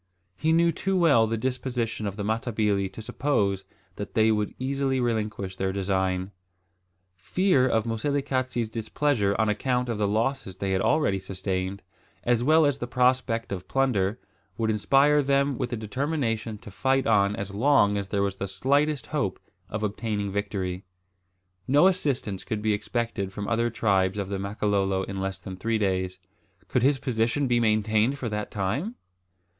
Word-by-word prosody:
He 155 - 0
knew 170 +1 +4
too 190 +4 -1
well 140 -11 +5
the 115 +1 -1
disposition 125 -3 -2
of 100 - -4
the 105 - -4
Matabili 105 -3 0
to 110 - -8
suppose 100 -7 0 0.3
that 100 - -6
they 110 0 +4
would 105 -1 -1
easily 135 0 0
relinquish 105 -5 -2
their 95 0 0
design. 95 -1 -1 0.8
Fear 130 - +2
of 110 0 +1
Moselekatse's 130 -1 -1
displeasure 115 -2 0
on 110 - +3
account 125 +4 0
of 115 -3 -2
the 105 - +2
losses 110 -1 -1
they 100 -1 -2
had 95 0 +1
already 150 -10 +2
sustained, 95 +1 -3 0.4
as 120 -1 +2
well 155 +3 +5
as 145 -1 +1
the 120 - -3
prospect 125 -2 +1
of 95 -2 -5
plunder, 120 -6 +1 0.4
would 110 -1 +1
inspire 140 +7 +4
them 140 0 +2
with - - -1
the 120 - -3
determination 115 -1 -2
to 105 -1 -12
fight 135 +6 +1
on 100 -2 +3
as 100 -2 -5
long 105 -2 +4
as 100 -1 -2
there 100 0 0
was 100 -1 -2
the 100 - -3
slightest 140 +8 +1
hope - - -2 0.3
of 105 +1 -3
obtaining 105 -1 -2
a - - -6
victory. 95 -2 -3 0.8
No 145 +6 +5
assistance 140 - 0
could 105 -1 -4
be 110 -1 +2
expected 105 -2 -2
from 100 +1 -5
other 115 +1 +1
tribes 100 -4 +1
of 100 -2 -3
the 100 -1 -2
Makololo 100 -1 0
in 95 0 -5
less 95 0 -3
than 95 -1 -8
three 115 +4 0
days. 95 -3 -1 0.5
Could 125 - +1
his 135 +3 +3
position 120 +2 0
be 120 -1 +3
maintained 110 +3 +2
for 125 -4 -3
that 105 0 -3
time? 120 - -2
110 Hz, 170 wpm, -26 LUFS, 100-130 Hz, 0.8 s, well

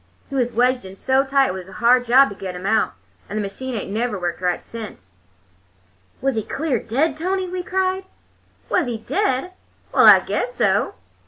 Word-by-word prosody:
He - - -4
was 245 -2 +1
wedged 250 +2 +2
in 190 0 -10
so 265 +6 +2
tight 275 0 +2
it - - -2
was 190 0 -8
a - - -12
hard 245 +4 +3
job 260 +3 +6
to 200 - -8
get 190 -2 -6
him 180 +1 -7
out, 220 +2 +2 0.4
and 210 - -4
the - - 0
machine 250 +6 -5
ain't 200 -2 -4
never 220 -1 -1
worked 175 0 -3
right 180 -1 0
since." 200 - -10 1.1
"Was 270 0 +1
he 220 - -1
clear 270 +2 -2
dead, 275 +7 0
Tony?" 370 +4 -2
we 365 0 -4
cried. 375 +1 -1 0.6
"Was - - +1
he 235 -2 -2
dead? 360 - -1 0.4
Well, - - +6
I - - +10
guess - - -3
so! - - +1
245 Hz, 195 wpm, -21 LUFS, 200-280 Hz, 1.1 s, I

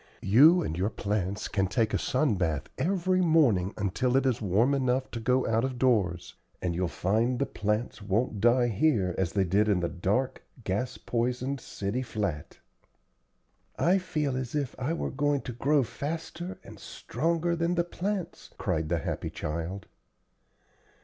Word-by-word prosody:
You 150 - +6
and 80 - -3
your 95 +4 0
plants 100 -2 -2
can 95 -2 0
take 110 +2 0
a - - +2
sun 130 -1 +1
bath 80 -6 -1 0.2
every 185 0 +1
morning 135 - +3
until 125 +6 +1
it 135 - +2
is 125 -3 +1
warm, 110 +7 +2
enough 130 -1 0
to 115 - -4
go 125 +3 +2
out 115 +1 +1
of 130 -1 -2
doors, 105 -10 +1 0.3
and 90 - -1
you'll 90 +1 0
find 110 +9 0
the - - +1
plants 105 +1 -2
won't 105 +1 -1
die 120 +1 +4
here 105 - +2
as 90 -3 0
they 100 - +2
did 100 +4 +2
in 100 -3 +3
the 85 - 0
dark, 100 +10 -1 0.2
gas 105 +7 -2
poisoned 125 +3 -2
city 100 +6 -3
flat." 105 - -4 1.2
"I 185 +3 +3
feel 150 -7 -2
as 130 +1 -4
if 140 -4 -1
I 130 +4 -1
were 170 - -3
going 145 0 +1
to 125 - -6
grow 140 +4 +2
faster 160 +9 -5
and - - -12
stronger 170 +6 -1
than 170 +1 0
the 170 - +2
plants," 185 +2 -4
cried 80 -1 -1
the 85 - +1
happy 75 - -3
child. 85 +5 -4
120 Hz, 165 wpm, -28 LUFS, 100-140 Hz, 1.2 s, You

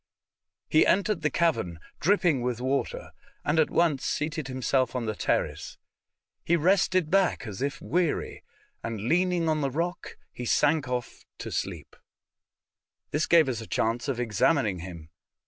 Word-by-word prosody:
He 155 - +5
entered 200 -2 +2
the 150 - +1
cavern 140 - 0 0.2
dripping 175 -6 +2
with 120 -1 -2
water, 130 +2 -2 0.3
and 150 +2 +2
at 155 - +3
once 160 -6 +2
seated 155 -1 -2
himself 130 -1 0
on 125 -2 -1
the 110 - -1
terrace. - - -2 0.7
He 170 - +2
rested 185 0 +2
back 190 -9 +2
as 105 -1 -7
if 140 0 -2
weary, 175 -2 -1 0.4
and 115 -3 -4
leaning 175 - +1
on 155 -1 +1
the 140 - 0
rock 170 +6 -4 0.3
sank 145 +4 +2
off 125 -1 -4
to - - -6
sleep. - - -4 1.2
This 150 +1 0
gave 165 -4 +5
us 120 -4 -2
a 110 - -9
chance 115 +4 -1
of 135 -4 -2
examining 115 - +1
him. 85 -3 -9
145 Hz, 145 wpm, -27 LUFS, 120-170 Hz, 1.2 s, He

